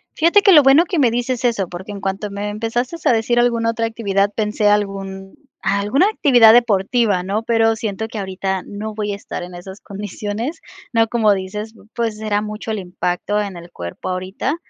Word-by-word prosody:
Fíjate 340 +6 +4
que 400 - +5
lo 310 -5 +9
bueno 275 +4 +6
que 345 -1 -1
me 255 -4 +4
dices 245 +1 -2
eso, 205 -7 0
porque 185 +4 -8
en 200 - -8
cuanto 195 +2 -3
me 200 +1 -4
empezaste 230 +8 -2
a - - +5
decir 235 +1 +1
alguna 235 -1 +2
otra 230 0 -2
actividad, 200 -3 0
pensé 210 -1 0
algún 195 -2 -1 0.3
alguna 205 - +2
actividad 245 - +6
deportiva, 220 -3 +2
¿no? 200 +4 -2
Pero, 225 -1 +2
siento 220 -1 -3
que 225 - -8
ahorita 190 -1 -3
no 215 +1 -6
voy 210 -1 -2
a - - -3
estar 200 - -7
en 180 +1 -9
esas 190 +3 -10
condiciones, 210 - -5 0.3
¿no? 225 -1 +3
Como 220 -2 +3
dices, 210 +3 -5 0.2
pues, 225 -2 -2
será 210 -1 -1
mucho 215 +1 -5
el 215 - -2
impacto 180 +2 -2
en 200 -3 -3
el 170 0 -12
cuerpo 85 - -7
ahorita. 185 +10 -2
210 Hz, 190 wpm, -19 LUFS, 195-230 Hz, 0.3 s, lo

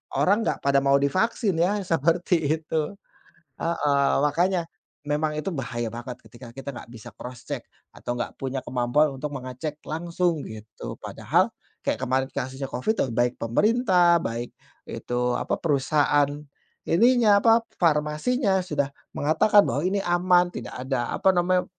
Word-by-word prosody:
orang 210 +4 +2
nggak - - 0
pada 140 0 +4
mau 140 0 +4
divaksin, 190 - +1
ya, 200 +4 +2
seperti 165 +2 +1 0.3
itu. 155 +4 -2 0.7
Heeh, 145 -4 +1
makanya 175 +4 +1 0.4
memang 150 +1 0
itu 155 +5 -2
bahaya 120 -5 -3
banget 120 +1 -7
ketika 115 +1 -13
kita 135 +2 -7
nggak - - -10
bisa 115 -3 -10
cross-check 125 -1 -7 0.3
atau 120 - -4
nggak 120 - -4
punya 135 0 -3
kemampuan 130 +4 +1
untuk 145 +2 -5
mengecek 130 +4 -6
langsung, 170 +1 -1
gitu. 110 -1 -9
Padahal - - 0 0.3
kayak - - -1
kemarin 130 +1 +1
kasusnya 130 +1 -4
COVID, 130 - -1
baik 120 +1 +1
pemerintah, 180 - +3
baik 115 +1 -4 0.4
itu 125 0 -2
apa, - - -1
perusahaan 145 -1 +2 0.6
ininya, 230 +2 +5
apa, 230 0 +5 0.2
farmasinya 175 - +1
sudah 150 -5 -1 0.3
mengatakan 160 +8 +4
bahwa 140 +6 -1
ini 195 +2 +1
aman, 175 0 +3
tidak - - -7
ada 125 -2 -2
apa 190 - +3
namanya, 180 +1 +2
150 Hz, 140 wpm, -25 LUFS, 130-180 Hz, 0.7 s, ininya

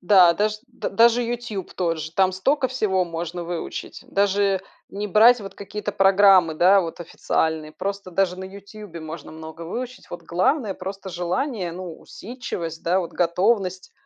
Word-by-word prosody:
Да. 180 -2 +6
Даже 210 +3 0
д 250 - -5
даже 235 +4 +5
"Ютуб" 235 -5 -4
тоже, 165 -3 -2
там 190 -1 +4
стока 265 +9 +1
всего 195 -7 +1
можно 170 +1 -5
выучить. 170 0 -6
Даже 200 -1 +2 0.3
не 205 +1 -4
брать 225 +5 +6
вот 195 - -8
какие-то 205 +1 -5
программы, 195 -4 +5
да, 190 +4 +5
вот 165 -1 -5
официальные. 160 -2 -1
Просто 200 0 -5
даже 180 0 +1
на 190 - -6
"Ютубе" 200 -2 -10
можно 160 0 -8
много 160 +1 -9
выучить. 250 +9 -6
Вот 175 - -7
главное- 215 - +1
просто 195 +1 -7
желание, 180 - -2
ну, 175 -2 -8
усидчивость, 180 -9 -7
да, 180 +3 +2
вот 170 - -6
готовность 185 +2 0
190 Hz, 155 wpm, -23 LUFS, 175-210 Hz, 0.3 s, Да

